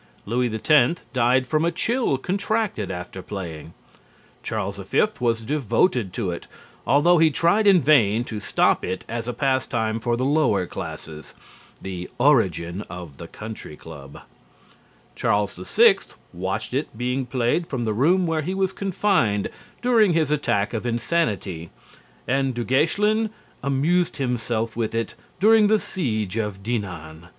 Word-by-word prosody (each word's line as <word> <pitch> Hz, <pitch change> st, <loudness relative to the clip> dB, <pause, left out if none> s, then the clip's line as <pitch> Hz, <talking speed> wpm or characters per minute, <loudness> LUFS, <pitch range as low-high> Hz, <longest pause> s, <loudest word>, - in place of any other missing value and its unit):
Louis 120 Hz, +2 st, 0 dB
X 130 Hz, +7 st, +3 dB
died 125 Hz, +1 st, +3 dB
from 155 Hz, +5 st, 0 dB
a 170 Hz, -, +2 dB
chill 230 Hz, -, 0 dB
contracted 200 Hz, -, -1 dB
after 90 Hz, +1 st, -6 dB
playing. 85 Hz, -5 st, -7 dB, 0.7 s
Charles 100 Hz, -2 st, -3 dB
V 95 Hz, -1 st, +1 dB, 0.2 s
was 115 Hz, -2 st, +1 dB
devoted 125 Hz, -, +1 dB
to 100 Hz, -5 st, -2 dB
it, 85 Hz, -, -7 dB, 0.4 s
although 165 Hz, +5 st, +5 dB
he 160 Hz, 0 st, +6 dB
tried 170 Hz, +8 st, +2 dB
in 190 Hz, -4 st, +6 dB
vain 120 Hz, -6 st, +4 dB
to 110 Hz, -3 st, -6 dB
stop 105 Hz, -, +2 dB
it 95 Hz, -, -4 dB
as 115 Hz, 0 st, -4 dB
a -, -, 0 dB
pastime 120 Hz, -4 st, 0 dB
for 120 Hz, 0 st, -1 dB
the 130 Hz, -, -1 dB
lower 135 Hz, -10 st, +2 dB
classes 80 Hz, -2 st, -8 dB, 0.4 s
(the 90 Hz, -2 st, -6 dB
origin 100 Hz, -, +2 dB
of 85 Hz, -5 st, -9 dB
the 85 Hz, -, -8 dB
country 110 Hz, -7 st, -9 dB
club); 70 Hz, -3 st, -12 dB, 0.9 s
Charles 105 Hz, -1 st, +1 dB
VI 90 Hz, -, +4 dB, 0.4 s
watched 95 Hz, +6 st, -3 dB
it 135 Hz, -4 st, -3 dB
being 125 Hz, +2 st, -1 dB
played 125 Hz, +7 st, 0 dB
from 125 Hz, -4 st, -3 dB
the 110 Hz, -, 0 dB
room 175 Hz, -, +3 dB
where 165 Hz, -2 st, 0 dB
he 185 Hz, +5 st, -3 dB
was 190 Hz, -1 st, 0 dB
confined 185 Hz, -, +1 dB, 0.3 s
during 225 Hz, -7 st, +4 dB
his 160 Hz, -3 st, +1 dB
attack 110 Hz, -9 st, 0 dB
of 110 Hz, -, -2 dB
insanity 110 Hz, -, -1 dB, 0.6 s
and 135 Hz, 0 st, 0 dB
Du 120 Hz, -, -2 dB
Guesclin 210 Hz, -, +2 dB, 0.3 s
amused 155 Hz, +6 st, +1 dB
himself 120 Hz, -4 st, -2 dB
with 115 Hz, -1 st, -2 dB
it 115 Hz, 0 st, -2 dB, 0.3 s
during 215 Hz, +2 st, +6 dB
the 215 Hz, +1 st, +4 dB
siege 110 Hz, -, -3 dB
of 105 Hz, -3 st, -3 dB
Dinan. 85 Hz, -8 st, -5 dB
120 Hz, 145 wpm, -23 LUFS, 100-155 Hz, 0.9 s, he